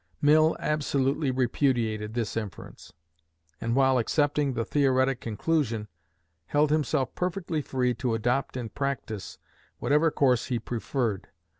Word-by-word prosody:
Mill 155 +2 +4
absolutely 140 -1 0
repudiated 120 -4 0
this 115 -4 -2
inference, 105 -7 -7 0.7
and, 115 +1 0
while 130 -1 +4
accepting 145 +2 +1
the 115 -2 -2
theoretic 130 -2 +2
conclusion, 115 -2 -1 0.6
held 150 0 +2
himself 150 -4 +1
perfectly 175 -3 -2
free 125 -3 0
to 120 -1 -1
adopt 125 +4 -1
in 120 -3 -4
practice 125 -6 -4 0.4
whatever 150 +3 +3
course 130 -5 +2
he 125 - 0
preferred. 115 -2 -2
130 Hz, 120 wpm, -27 LUFS, 115-145 Hz, 0.7 s, Mill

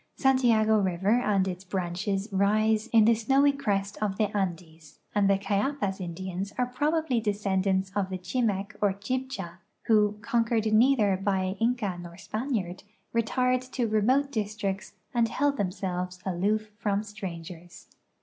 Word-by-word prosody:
Santiago 230 -5 +3
river 195 +4 +2
and 200 -5 +1
its 185 0 -5
branches 190 +2 -2
rise 215 +3 +2
in 225 -2 +5
the 230 - +6
snowy 270 +6 +3
crest 200 -8 -2
of 200 -2 -1
the 210 -1 0
Andes, 165 -5 -4 0.2
and 205 -1 +3
the 195 - +4
Cayapas 200 0 -1
Indians 185 +2 -5
are 250 0 -1
})robably 305 -5 +1
descendants 195 -2 0
of 195 -2 0
the 185 - -3
Chimec 200 +1 -1
or 205 -2 +3
Chibcha, 200 -4 -4 0.2
who, 210 -2 +3
conquered 230 -1 +1
neither 220 -4 +4
by 190 -1 0
Inca 225 -6 0
nor 170 0 -10
Spaniard, 215 -4 -3 0.3
retired 250 +2 +1
to 255 -2 -2
remote 255 +7 +2
districts 205 -3 -3 0.2
and 235 -2 +2
held 285 +4 +1
themselves 180 -2 -3
aloof 210 +4 0
from 205 -2 0
strangers. 175 -4 -8
205 Hz, 140 wpm, -27 LUFS, 190-230 Hz, 0.3 s, the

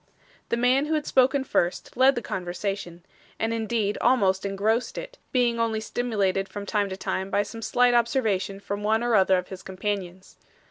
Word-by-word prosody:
The 235 - 0
man 255 +4 +3
who 315 - +1
had 300 -1 -1
spoken 265 +1 +3
first, 175 -8 -1
led 260 +2 +5
the 240 - -3
conversation, 180 -1 -4 0.3
and 225 +1 -1
indeed 220 -2 -1
almost 200 -6 +3
engrossed 215 +5 0
it, - - -7
being 240 -2 +2
only 225 -1 0
stimulated 205 -4 -1
from 205 0 -6
time 205 0 0
to 190 - -5
time 190 0 -3
by 205 - +2
some 225 +2 -9
slight 245 +2 +3
observation 225 -5 +1
from 200 0 -5
one 220 +2 +1
or 240 -1 +1
other 190 -2 +5
of 180 - -4
his 190 -1 -8
companions. 190 -1 -5
215 Hz, 180 wpm, -25 LUFS, 195-240 Hz, 0.3 s, led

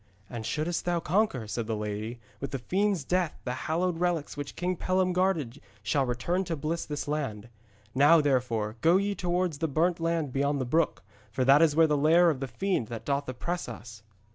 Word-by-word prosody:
'And 115 -3 -5
shouldst 160 +3 -2
thou 175 -1 +1
conquer,' 170 - 0
said 110 +1 -3
the 110 - -1
lady, 105 +3 -4 0.2
'with 140 - -4
the 135 - -3
fiend's 190 +5 0
death 175 +1 -1
the 125 - -2 0.2
hallowed 170 +1 0
relics 175 -4 -1
which 145 -1 -6
King 180 +1 -1
Pellam 185 +1 +1
guarded 165 -9 0 0.2
shall 135 +5 +1
return 150 +10 -1
to 170 - -2
bless 160 +3 -3
this 145 -1 -4
land. 120 -8 -3 0.4
Now, 145 +5 +6
therefore, 125 -6 0
go 170 +3 +5
ye 200 +1 0
towards 180 -4 -1
the 160 - 0
Burnt 165 +4 +1
Land 165 -5 -1
beyond 140 +1 +1
the 130 - -1
brook, 140 - 0 0.3
for 130 +4 0
that 140 +3 +6
is 155 -3 +4
where 165 0 +6
is - - -1
the 150 - +2
lair 165 +4 +5
of 140 - -4
the 135 - -3
fiend 185 - -1
that 115 -1 -7
doth 140 -1 -1
oppress 170 +6 -3
us.' 110 -1 -10
150 Hz, 205 wpm, -28 LUFS, 125-175 Hz, 0.4 s, Now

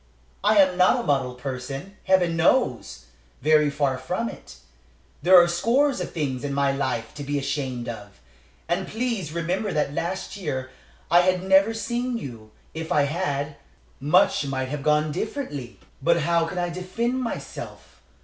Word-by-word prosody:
I 210 +1 +4
am 185 -2 +5
not 185 +7 +5
a - - -3
model 135 - 0
person, 135 +8 -6
Heaven 180 -3 +3
knows! 125 - +1 0.4
very 150 0 +4
far 140 -2 0
from 230 +6 -2
it. - - -11 0.7
There 185 +1 +8
are 175 - +5
scores 235 +9 +2
of - - -4
things 140 -6 -3
in 140 -1 -2
my 140 -1 +2
life 130 -4 -2
to 145 - -7
be 145 +1 -2
ashamed 135 -3 -3
of. 105 - -8 0.5
And 180 +2 -1
please 225 - -2
remember 175 +5 -1
that 150 -2 0
last 175 +6 -3
year 130 -8 -4 0.4
I 175 - +7
had 185 0 +1
never 195 +4 +4
seen 240 +2 -2
you; 115 - -8 0.2
if 160 0 -6
I 145 - +4
had, 145 -2 -2 0.4
much 160 +8 +3
might 130 -1 -2
have 150 0 -4
gone 150 +1 +2
differently. 145 - -5 0.2
"But 170 +4 +3
how 170 +1 +2
can 180 - -6
I 175 0 0
defend 225 +9 -2
myself? 235 - -7
160 Hz, 160 wpm, -24 LUFS, 140-190 Hz, 0.7 s, There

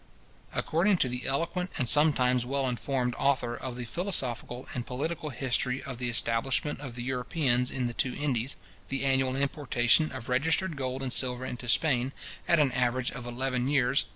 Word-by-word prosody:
According 185 +5 +2
to 135 - +2
the 125 +1 -4
eloquent, 170 +6 -1
and 125 - 0
sometimes 125 -4 +4
well 135 +2 0
informed, 125 0 -1
author 130 -4 +1
of 130 -1 -5
the 125 0 -5
Philosophical 130 - -1
and 120 - -2
Political 150 +5 -3
History 130 -1 -1
of 130 -5 -6
the 125 -1 -1
Establishment 120 +5 0
of 135 -5 -7
the 120 - -4
Europeans 125 0 +1
in 130 -2 -2
the 120 - -2
two 130 +1 0
Indies, 135 -3 -1 0.3
the 135 0 -1
annual 135 -1 +2
importation 140 0 +2
of 130 -3 -7
registered 160 +7 +1
gold 130 -1 -3
and 130 -1 -3
silver 125 -1 0
into 125 -1 -5
Spain, 130 +2 +2 0.3
at 170 - +5
an 145 -3 +4
average 125 0 0
of 125 -1 -7
eleven 125 +1 -1
years, 135 -1 +3
viz. - - -10
130 Hz, 180 wpm, -29 LUFS, 125-140 Hz, 0.3 s, at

